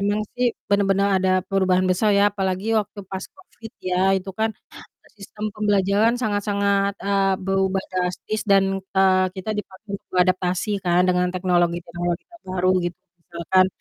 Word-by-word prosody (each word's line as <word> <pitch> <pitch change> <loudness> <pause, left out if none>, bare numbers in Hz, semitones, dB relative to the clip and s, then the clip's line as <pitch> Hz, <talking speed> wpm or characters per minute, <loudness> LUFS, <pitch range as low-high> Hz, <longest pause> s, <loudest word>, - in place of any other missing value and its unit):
emang 205 +1 0 0.2
sih 250 0 +2 0.2
bener-bener 200 0 +2
ada 185 0 +1 0.2
perubahan 185 -1 +2
besar 210 +4 +2
ya 200 +1 +5
apalagi 190 0 -2
waktu 210 -1 -2
pas 190 0 -4
Covid 230 - -14
ya, 180 -1 -2 0.2
itu 190 +1 -5
kan 220 - +2 0.7
sistem 210 +1 -9
pembelajaran 205 +2 +2
sangat-sangat, 200 -2 0
eee, 195 -1 +1
berubah 195 0 +1
drastis 185 +4 -2
dan, 195 -1 +6 0.3
eee, 185 -1 +4
kita 190 +3 -4
dipaksa 205 0 -8
untuk - - -25
beradaptasi 185 +2 +1
kan 175 0 +3
dengan 180 0 +1
teknologi-teknologi 175 -1 -1
terbaru 185 - -2
gitu. 175 0 -4 0.3
Misalkan 180 +2 +2
195 Hz, 140 wpm, -22 LUFS, 185-205 Hz, 0.7 s, dan